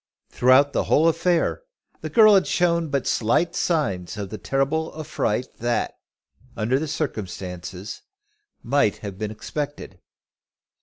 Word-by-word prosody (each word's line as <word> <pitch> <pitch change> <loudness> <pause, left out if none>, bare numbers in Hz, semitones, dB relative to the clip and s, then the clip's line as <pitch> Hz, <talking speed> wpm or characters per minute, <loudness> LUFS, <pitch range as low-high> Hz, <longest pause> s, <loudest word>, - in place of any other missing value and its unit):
Throughout 130 +3 +4
the - - 0
whole 160 +3 +4
affair 170 - +1 0.4
the - - -4
girl 215 -2 +7
had 195 -2 +4
shown 170 -2 +1
but 140 -2 -1
slight 160 +10 +1
signs 105 - -1
of 100 -2 -5
the 110 - -6
terrible 145 +4 -1
affright 130 -5 -2
that, 120 0 -1 0.6
under 120 +5 +1
the 160 - -3
circumstances, 95 - -5 0.6
might 130 -5 +2
have 100 -1 -7
been 110 -1 -2
expected. 125 -2 -6
135 Hz, 125 wpm, -23 LUFS, 105-160 Hz, 0.6 s, girl